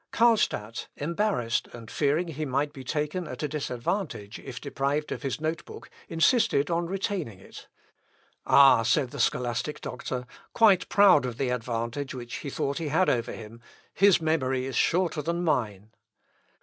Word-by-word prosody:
Carlstadt 215 - +1
embarrassed, 165 - -1
and 115 -2 -10
fearing 155 +4 +1
he 155 0 -4
might 145 +1 -1
be 135 - -9
taken 150 +6 -2
at 130 +3 -7
a - - +1
disadvantage 135 - -3
if 125 -4 -8
deprived 140 +2 -2
of - - -4
his 135 0 -3
note 160 +2 -2
book, - - -12 0.2
insisted 165 - +2
on 170 0 0
retaining 185 - -3
it. 95 - -13 0.8
"Ah!" 135 -4 +7
said 120 +3 +1
the - - -8
scholastic 125 +4 -1
doctor, 125 0 -5 0.3
quite 205 -6 +4
proud 200 -8 +6
of 125 -2 -4
the 135 -1 -1
advantage 125 +3 -3
which 120 -1 -6
he 145 - -6
thought 140 +2 -2
he 165 - -3
had 160 +6 +2
over 120 -1 -1
him, 115 +1 -10 0.3
"his 200 -1 +5
memory 135 -5 0
is 135 -2 -5
shorter 170 0 +1
than 170 +3 -2
mine." 110 - -1
140 Hz, 160 wpm, -27 LUFS, 125-165 Hz, 0.8 s, Ah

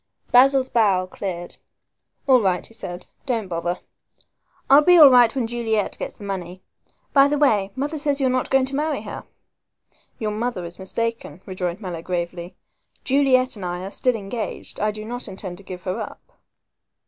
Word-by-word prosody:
Basil's 265 +1 +5
brow 200 -6 +3
cleared. 180 -2 -6 0.7
"All 260 -3 +5
right," 185 -3 0
he - - -13
said, 180 -5 -7 0.2
"don't 230 -6 -1
bother, 175 0 -3 0.9
I'll 280 +2 +7
be 355 +3 +6
all 295 -4 +10
right 245 -1 +6
when 255 -3 0
Juliet 225 -3 -1
gets - - -5
the - - -12
money. 185 -2 -6 0.5
By 275 -1 +7
the 295 +1 0
way, 210 -9 +2
mother 290 +4 -3
tells 285 -1 0
me - - 0
you - - +4
are 255 - +1
not 255 - -1
going 270 -1 +3
to 270 +1 -5
marry 305 +2 -1
her." - - -7 0.9
"Your 215 -2 -2
mother 215 -4 -3
is 170 +2 -9
mistaken," 230 -4 -3
rejoined 185 0 -4
Mallow 175 -4 -5
gravely. 175 0 -4 0.5
"Juliet 260 -2 +3
and 200 - -9
I 175 0 -4
are 195 - -6
still 250 +2 +1
engaged. 215 +1 -6
I 210 - +1
do 215 0 -6
not 245 +2 -5
intend 185 -1 -7
to - - -13
give 185 -1 -9
her 185 -1 -3
up." - - -9
215 Hz, 185 wpm, -22 LUFS, 185-260 Hz, 0.9 s, all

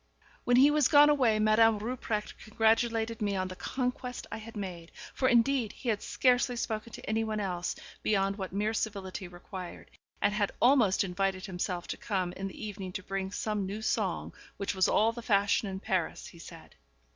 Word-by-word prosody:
When 245 - +4
he 280 +3 +7
was 295 -3 +4
gone 295 0 +7
away, 250 -7 +3
Madame 215 +1 +4
Rupprecht 215 -1 -3
congratulated 225 +1 +1
me 205 -1 0
on 185 -1 -1
the 185 - -7
conquest 250 +2 -3
I - - -4
had 220 0 -9
made; 175 -4 -6 0.2
for, 260 - +2
indeed, 240 -1 +3
he 245 - -5
had 210 -2 0
scarcely 250 -1 +2
spoken 225 -1 -3
to - - -9
anyone 220 0 -1
else, 180 -3 -2 0.3
beyond 195 -1 +1
what 190 - -4
mere 210 +3 0
civility 195 -4 -3
required, 175 +1 -9 0.3
and 205 0 +2
had 205 -1 0
almost 240 -8 +4
invited 190 0 -1
himself 180 -2 -3
to - - -3
come 185 -4 -2
in 195 +1 -4
the 195 - -7
evening 195 -3 -6
to 185 - -5
bring 190 0 -3
some 205 -1 -2
new 210 +3 -5
song, - - -1 0.2
which 200 - -2
was 190 -1 +3
all 220 +2 +3
the 235 +1 -8
fashion 205 -1 +2
in 190 0 -5
Paris, 185 -4 -2
he 170 - -12
said. - - -12
210 Hz, 185 wpm, -30 LUFS, 190-230 Hz, 0.3 s, he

